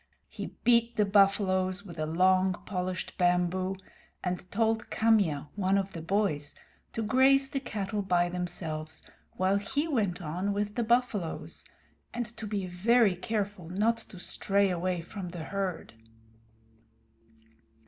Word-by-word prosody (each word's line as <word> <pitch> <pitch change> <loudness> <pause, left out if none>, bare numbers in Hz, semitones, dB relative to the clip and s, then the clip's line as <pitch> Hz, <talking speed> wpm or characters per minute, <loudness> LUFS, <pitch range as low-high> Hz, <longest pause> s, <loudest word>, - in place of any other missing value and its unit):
He - - -6 0.2
beat 235 -1 +4
the 210 -2 +3
buffaloes 195 -1 +3
with 170 -4 -9
a 155 - -1
long, 185 +3 +3
polished 185 -2 -3
bamboo, 180 +1 +2 0.5
and 180 0 -3
told 225 +1 +1
Kamya, 195 -11 +2
one 195 -1 +2
of 195 0 -1
the 165 - -6
boys, 165 -5 0 0.4
to 225 - -2
graze 270 +4 +4
the 275 - -1
cattle 210 -5 -3
by 180 -2 +2
themselves, 165 -3 -4 0.3
while 190 +2 +2
he 270 +10 -1
went 210 - 0
on 180 +5 -2
with 205 0 -2
the 240 - -1
buffaloes, 230 -7 -1 0.5
and 240 0 -1
to 220 - -5
be 200 -2 -2
very 200 +3 +3
careful 200 -2 -3
not 215 +5 +2
to 220 -4 -12
stray 195 +2 +1
away 180 0 -1
from 180 +1 -7
the 170 -2 -6
herd. 195 - -3
195 Hz, 140 wpm, -29 LUFS, 180-215 Hz, 0.5 s, beat